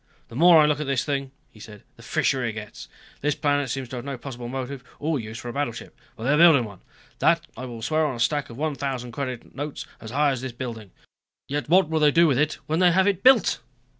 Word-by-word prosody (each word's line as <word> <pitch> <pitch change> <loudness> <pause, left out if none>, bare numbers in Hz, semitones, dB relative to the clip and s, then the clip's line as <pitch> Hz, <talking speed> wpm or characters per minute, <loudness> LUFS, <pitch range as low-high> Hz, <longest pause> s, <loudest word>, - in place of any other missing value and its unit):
"The 115 - -11
more 170 +4 +7
I 150 - +6
look 150 -1 +1
at 150 - -3
this 135 -2 0
thing," 140 -2 -2 0.2
he 110 - -18
said, 105 -1 -12
"the - - -16
fishier 130 -2 0
it 115 -2 -2
gets. 105 -1 -9 0.3
This 150 0 0
planet 145 -2 0
seems 130 +1 -3
to 125 - -6
have 120 - -7
no 140 -2 -4
possible 120 -1 -7
motive 130 +1 -5
or 155 -1 -1
use 110 0 -7
for 120 - -8
a - - -6
battleship. 140 -5 -4 0.2
But 110 - -9
they 135 - +1
are - - +3
building 160 -6 +7
one 100 -4 -11 0.4
that - - +3
I 130 - -6
will 115 -3 -8
swear 155 +4 +1
on 130 - -3
a - - -8
stack 140 +4 0
of 115 - -10
one 155 +1 -1
thousand 130 -3 -4
credit 130 -1 -5
notes 145 +1 -5
as 110 - -9
high 145 +4 +2
as 130 -2 -3
this 130 -2 -5
building. 115 -4 -7 0.6
Yet 145 -1 -3
what 185 0 +5
will 160 0 0
they 150 -1 +5
do 165 +4 +5
with 135 -5 +2
it 155 +1 +1
when 160 +2 -1
they 180 -1 +5
have 190 +3 +3
it 195 -2 +1
built? 255 -3 +5
135 Hz, 255 wpm, -24 LUFS, 120-150 Hz, 0.6 s, more